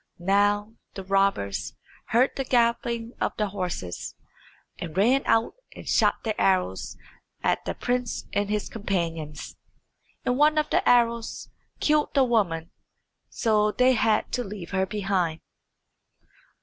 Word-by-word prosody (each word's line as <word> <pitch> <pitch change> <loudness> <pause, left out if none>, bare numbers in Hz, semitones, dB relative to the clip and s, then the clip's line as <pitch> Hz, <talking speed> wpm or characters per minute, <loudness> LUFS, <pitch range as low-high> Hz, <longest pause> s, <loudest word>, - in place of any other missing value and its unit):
Now 205 +3 +1 0.2
the 195 - -6
robbers 195 - 0 0.3
heard 245 +4 +3
the 270 - -1
galloping 235 -1 +1
of - - 0
the 210 -1 0
horses, 180 - -5 0.6
and 165 0 -6
ran 245 +7 +4
out 225 0 +2 0.2
and - - -11
shot - - +2
their 220 - -1
arrows 185 - 0 0.5
at - - +1
the - - -3
prince 245 -1 -2
and 205 0 0
his 210 -1 -1
companions. 165 -8 -4 0.7
And 250 +1 +1
one 305 +1 +4
of 305 0 +1
the - - +2
arrows 235 -1 +2 0.3
killed 300 0 +1
the 275 - +5
woman, 190 -9 0 0.6
so 215 -2 +2
they 255 +3 +4
had 220 -2 +1
to 250 - -1
leave 195 -5 -8
her 190 -1 0
behind. 190 -5 -1
210 Hz, 135 wpm, -26 LUFS, 190-240 Hz, 0.7 s, the